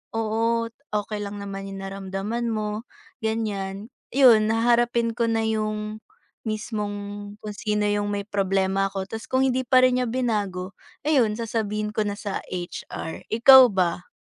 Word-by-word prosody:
oo, 230 +1 0 0.2
okay 210 0 -2
lang 205 0 -5
naman 195 -1 -6
'yong 195 0 -7
naramdaman 195 +4 -3
mo, 215 +1 -3 0.3
ganyan. 215 -2 -3 0.2
'Yon, 235 -6 +7
haharapin 235 0 +2
ko 235 0 0
na 225 -1 +1
'yong 215 -1 -2 0.5
mismong, 205 -1 -4
kung 210 - -4
sino 210 0 -1
'yong 205 0 +1
may 205 -1 -2
problema 195 -1 +1
ako, 195 -1 -4
tapos 225 +3 -7
kung 260 +1 +2
hindi 260 -1 0
pa 255 -1 +5
rin 255 0 +4
niya 250 - 0
binago, 205 -7 -1 0.3
ayun, 255 -9 +3
sasabihin 215 -2 -2
ko 215 -1 -1
na 205 - -2
sa 205 -2 -4
HR. 175 -2 -6
Ikaw, 255 +3 +8
ba? 180 -4 -1
215 Hz, 150 wpm, -24 LUFS, 200-230 Hz, 0.5 s, Ikaw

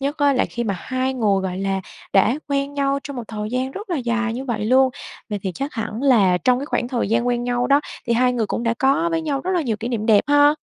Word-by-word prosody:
nhất 280 +3 -2
á 285 -1 +4
là 255 - +2
khi 240 0 -4
mà 200 -3 -1
hai 260 0 -2
người, 205 -5 +2
gọi 185 0 -3
là, 195 0 -1 0.3
đã 230 +8 +3
quen 280 0 -1
nhau 280 0 +1
trong 280 -2 -6
một 245 - -4
thời 210 -1 -4
gian 255 +2 -1
rất 400 +5 -8
là 340 - 0
dài 235 -2 -1
như 260 +3 -5
vậy 225 -5 -2
luôn. 260 +3 +4 0.4
Vậy 205 - -2
thì 190 -2 -2
chắc 275 +2 -4
hẳn 225 +2 -4
là 200 -10 +4
trong 250 +3 +2
cái 280 - -5
khoảng 245 -5 -1
thời 240 -6 -1
gian 235 +2 +1
quen 240 0 0
nhau 245 0 0
đó 280 +1 +4 0.3
thì 235 - +1
hai 250 +1 +3
người 230 -3 0
cũng 235 - -3
đã 230 0 +1
có 275 +6 +2
với 330 0 0
nhau 285 -4 -1
rất 370 - -3
là 340 - +1
nhiều 225 -6 -1
kỷ 225 +3 -5
niệm 225 -2 -2
đẹp 210 -3 +5
ha? 290 +1 +5
245 Hz, 280 wpm, -21 LUFS, 225-275 Hz, 0.4 s, đẹp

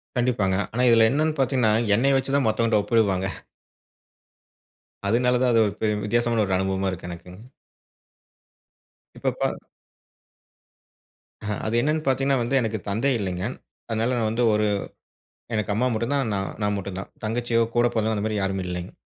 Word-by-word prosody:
கண்டிப்பாங்க. 120 -7 +1 0.2
ஆனா 125 +2 +1
இதில் 115 -1 +6
என்ன 145 +5 +1
என்று 155 -1 -1
பார்த்தீங்க 130 -1 +1
என்றால், 110 +1 +1
என்னை 135 +6 +3
வைத்து 135 +1 0
தான் 140 - +1
மற்றவன் 115 +1 +1
கிட்ட 105 -2 +4
ஒப்பிடுவாங்க 100 -5 +1 1.8
அதனால் 125 +3 +2
தான் 125 -1 +3
அது 115 - +4
ஒரு 100 - -3
பெர் 105 -1 0
வித்தியாசமான 120 0 +1
ஒரு 95 -1 0
அனுபவமாக 95 0 0
இருக்கு 90 -1 -7
எனக்குங்க. 90 +6 -10 1.7
இப்ப - - -1
ப - - -2 1.8
அ - - -4 0.2
அது 110 +1 -1
என்ன 145 +6 +1
என்று 155 0 -2
பார்த்தீங்க 135 0 +1
என்றால் 135 -2 +2
வந்து, 120 +4 -1
எனக்கு 110 -2 -1
தந்தை 115 +8 +1
இல்லைங்க. 90 -2 -3 0.5
அதனால் 115 +3 0
நான் 110 -2 +1
வந்து 120 +2 0
ஒரு 105 0 +2 0.9
எனக்கு 105 -1 -1
அம்மா 120 +5 +1
மட்டும் 115 +5 -1
தான், 140 -2 +1
நா 100 - 0 0.2
நான் 105 0 +1
மட்டும் 100 -1 -5
தான். 95 - -8
தங்கச்சியோ, 115 +1 0
கூட 120 0 +4
பிறந்தவங்க 110 0 0
அந்த 105 - -2
மாதிரி 105 -1 -1
யாரும் 95 -1 -1
இல்லைங்க. 90 0 -5
110 Hz, 170 wpm, -24 LUFS, 100-125 Hz, 1.8 s, இதில்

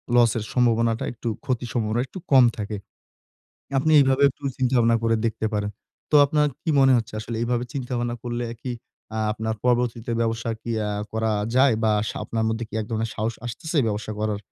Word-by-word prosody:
Loss 120 -2 +6
এর 110 - -2
সম্ভাবনাটা 115 -2 +2
একটু 120 0 -8 0.2
ক্ষতির 125 -1 -2
সম্ভাবনা 115 0 0
একটু 185 - -8
কম 130 -2 +8
থাকে। 105 0 -4 1.0
আপনি 155 +4 +2
এভাবে 135 0 +3
একটু 145 - -10 0.2
চিন্তাভাবনা 120 -3 +3
করে 115 0 +2
দেখতে 110 0 -1
পারেন। 105 0 -1 0.4
তো 150 - +6
আপনার 150 +1 +2 0.2
কি 165 - 0
মনে 135 -1 +6
হচ্ছে 115 -2 -3
আসলে 115 +1 -5
এইভাবে 120 0 0
চিন্তা 130 -3 -4
ভাবনা 120 0 -1
করলে 120 0 -3 0.2
কি 130 - -4 0.4
অ্যা 110 0 -3
আপনার 110 0 -3
পরবর্তীতে 120 -1 +1
ব্যবসা 115 0 -1
আরকি 115 +1 -7 0.2
আ - - -2 0.2
করা 110 0 0 0.3
যায়? 130 -2 +5
বা 110 - +4 0.2
সা - - -5
আপনার 110 -1 -1
মধ্যে 110 +1 -2 0.2
এক - - -3
ধরনের 115 0 -1
সাহস 110 +2 -2
আসতেছে 150 +7 -3
ব্যবসা 105 0 -3
করার 105 -1 -1
115 Hz, 185 wpm, -24 LUFS, 110-125 Hz, 1.0 s, কম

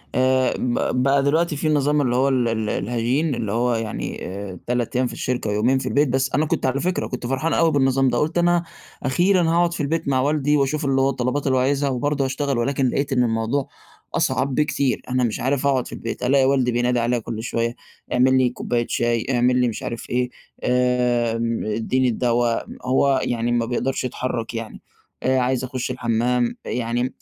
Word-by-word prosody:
آآ، 130 0 +3
ب 125 +1 0
بقى 135 +1 +3
دلوقتي 160 +3 +1
في 150 +2 -2
النظام 150 0 +2
اللي 125 -3 0
هو 135 +2 +3
ال 125 -3 +1
ال 110 -2 -1
الهجين، 120 +9 0
اللي 110 -4 -3
هو 120 +2 +1
يعني 115 -1 -4
آآ 95 -1 -7
3 120 -1 -1
أيام 125 0 +2
في - - -7
الشركة 125 -4 -2
ويومين 110 +6 +2
في - - -5
البيت، 145 +1 +2
بس 130 +1 0
أنا 150 +3 +2
كنت 155 - -1
على 130 +1 +1
فكرة، 180 +1 -1
كنت 125 -1 -5
فرحان 135 +6 -1
أوي 165 -1 +3
بالنظام 135 -2 +2
ده، 120 - 0
قُلت 160 +5 0
أنا 175 0 +3 0.4
أخيرًا 175 +8 +3
هاقعُد 170 +1 +2
في 170 - -3
البيت 160 +2 -1
مع 135 -2 +2
والدي 150 +1 +2
وأشوف 145 +2 0
اللي 135 -1 +2
هو 135 - +3
الطلبات 135 +2 -1
اللي 130 -1 +2
هو - - +3
عايزها 140 +2 +1
وبرضه 140 +2 0
هاشتغل، 135 0 -1
ولكن 130 +2 +1
لقيت 140 +2 -1
إن 125 -1 +3
الموضوع 115 +4 -1 0.5
أصعب 135 -1 0
بكتير، 140 -2 0
أنا 125 0 +1
مش 115 -3 -1
عارف 135 +2 0
أقعُد 130 -3 +1
في - - -9
البيت، 115 +2 -5
ألاقي 135 +1 +4
والدي 130 -2 +2
بينادي 120 +1 +1
عليَّ 120 +1 +1
كل 110 0 -5
شويّة، 115 0 -1 0.4
إعمِل 130 +1 +4
لي 130 -1 +3
كوباية 120 -1 -2
شاي، 120 -1 0
إعمِل 125 0 +2
لي 125 - +3
مش 115 - -4
عارف 115 -1 -5
إيه، 125 0 0 0.3
آمم 120 -2 +1
إدّيني 115 +4 0
الدوا، 120 0 +1 0.3
هو 130 +1 +3
يعني 120 0 -1
ما 120 -1 +1
بيقدَرش 125 +3 -2
يتحرّك 125 -2 -3
يعني، 115 -1 -6 0.4
أ 130 +1 +2
عايز 130 0 0
أخش 130 0 -3
الحمّام، 120 0 0
يعني 120 +1 -2
125 Hz, 200 wpm, -22 LUFS, 120-140 Hz, 0.5 s, ألاقي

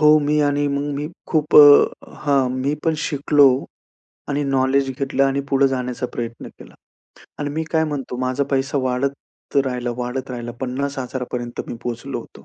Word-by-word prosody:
हो, 150 0 +7
मी 150 0 +1
आणि 145 0 0
मग 140 +1 -2
मी 145 +2 -3 0.2
खूप 155 -2 +1
अ, 145 -1 +9 0.3
हां. 140 -3 +3
मी 130 +3 -1
पण 165 -1 +2
शिकलो 145 -1 +4 0.8
आणि 145 0 0
नॉलेज 135 0 +1
घेतलं 135 0 0
आणि 135 0 +1
पुढे 135 0 +4
जाण्याचा 125 -1 -3
प्रयत्न 115 -1 -5
केला. - - -16 0.6
आणि 145 -1 -3
मी 160 +2 -2
काय 160 -1 +2
म्हणतो 140 -5 -4
माझा 130 +2 0
पैसा 135 +1 0
वाढत 130 +3 -4
राहिला, 125 -2 -2
वाढत 125 +2 -4
राहिला. 120 -1 -5
50,000 130 0 -3
पर्यंत 120 -1 -4
मी - - -4
पोहोचलो 120 -1 -4
होतो. 70 - -15
135 Hz, 165 wpm, -21 LUFS, 125-145 Hz, 0.8 s, अ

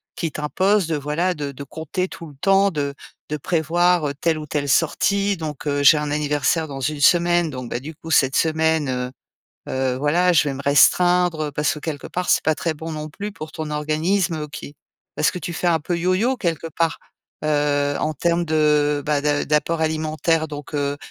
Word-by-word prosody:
qui 165 -3 -3
t'impose 185 +6 +1
de 165 - -1
voilà 150 +5 -1
de 145 -3 -5
de 140 +1 -9
compter 160 +6 -4
tout 170 - -10
le 145 - -14
temps 195 0 +4
de 145 -3 -2 0.4
de 150 - -2
prévoir, 170 +2 +1
heu, - - -4
telle 165 -2 +1
ou 155 - -6
telle 145 -1 -2
sortie 200 +7 +2
donc, 155 -3 -6
heu, 145 0 0
«J'ai 145 +2 +7
un 150 -1 -2
anniversaire 150 +2 0
dans 140 -2 -7
1 145 +2 -2
semaine 175 +2 +4
donc, 130 -4 -6
bah, - - -2
du 150 +5 -9
coup 165 +1 -9
cette 135 -3 +3
semaine, 160 -2 +1
heu 125 0 -2 0.6
heu, 130 -1 0
voilà 170 +7 +2
je 165 - +4
vais 140 - -3
me 135 - -7
restreindre». 175 +4 +4
Heu, - - -9
parce 150 +2 0
que - - -7
quelque 150 -2 -5
part 180 0 -2
c'est - - +4
pas 160 - +3
très 165 +2 -2
bon 160 +2 -7
non 155 0 -5
plus 205 +7 -6
pour 155 -5 -8
ton 155 -1 -5
organisme 155 +2 0
qui 145 0 -9 0.4
parce 155 - +3
que - - -5
tu 170 - -5
fais 175 +1 -3
un 165 -2 +2
peu 175 +3 -2
yoyo 185 +9 +1
quelque 165 -6 -2
part. 165 +1 -1 0.5
Heu, 145 -1 +1
en 155 0 -1
termes 170 +3 +1
de, 150 -2 +2
bah 150 -1 +1
da 145 0 0
d'apport 155 +2 0
alimentaire 160 +1 0
donc, 145 -2 -8
heu 145 0 -1
155 Hz, 210 wpm, -21 LUFS, 145-170 Hz, 0.6 s, J'ai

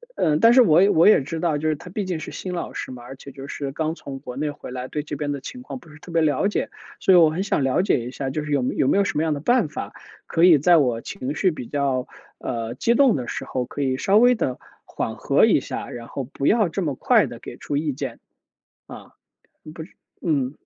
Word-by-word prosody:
呃， 150 -2 +2
但 230 - +6
是 255 0 +7
我 180 +2 +5
我 165 +5 +5
也 210 - +6
知 160 +4 -5
道， 155 -4 0
就 155 - 0
是 155 - +1
他 180 +4 -12
毕 205 +2 -2
竟 180 -3 -3
是 - - -7
新 185 -1 -6
老 - - -5
师 - - -5
嘛， 125 -1 -10
而 135 +2 -9
且 140 +1 -12
就 135 0 -9
是 140 -1 -5
刚 160 +2 -2
从 140 -5 -8
国 125 -2 -8
内 150 +2 -2
回 145 -3 -9
来， 125 0 -5
对 150 +1 -4
这 150 - -6
边 145 0 -3
的 140 - -3
情 250 - -8
况 255 - -7
不 165 -10 -16
是 155 - -15
特 175 - -12
别 165 -1 +2
了 150 +5 +2
解。 205 - -2 0.3
所 190 - +4
以 180 - +8
我 165 -2 +7
很 175 +5 -2
想 175 -8 0
了 135 +8 +2
解 145 - +2
一 120 +1 -6
下， 135 0 -4
就 150 +2 -3
是 150 - -6
有 140 -3 +2
有 130 - +1
没 - - +3
有 200 - +4
什 165 - -2
么 160 - +1
样 155 -2 0
的 145 - -5
办 240 - +2
法 - - -6 0.3
可 165 - 0
以 175 -4 +8
在 170 +4 +5
我 120 -5 +1
情 135 +3 -5
绪 185 +1 +2
比 125 -6 -7
较， 135 -3 -1 0.3
呃， 115 -2 -4
激 235 - +1
动 275 - +5
的 125 -3 -4
时 - - -4
候， 125 -1 -3
可 145 - -4
以 130 -1 0
稍 200 +8 +3
微 245 +2 +6
地 130 - -2 0.3
缓 - - -4
和 - - +3
一 - - +4
下， - - -6
然 115 -1 -8
后 135 - -5
不 135 +2 -3
要 215 -4 +4
这 190 +4 -3
么 145 -6 -2
快 - - +3
地 - - -9
给 - - -9
出 145 - -3
意 150 -2 -1
见。 - - -6 0.7
啊， - - -11 0.6
不 160 - -8
是 160 - -14 0.3
嗯。 140 -6 0
150 Hz, 290 characters per minute, -23 LUFS, 135-180 Hz, 0.7 s, 以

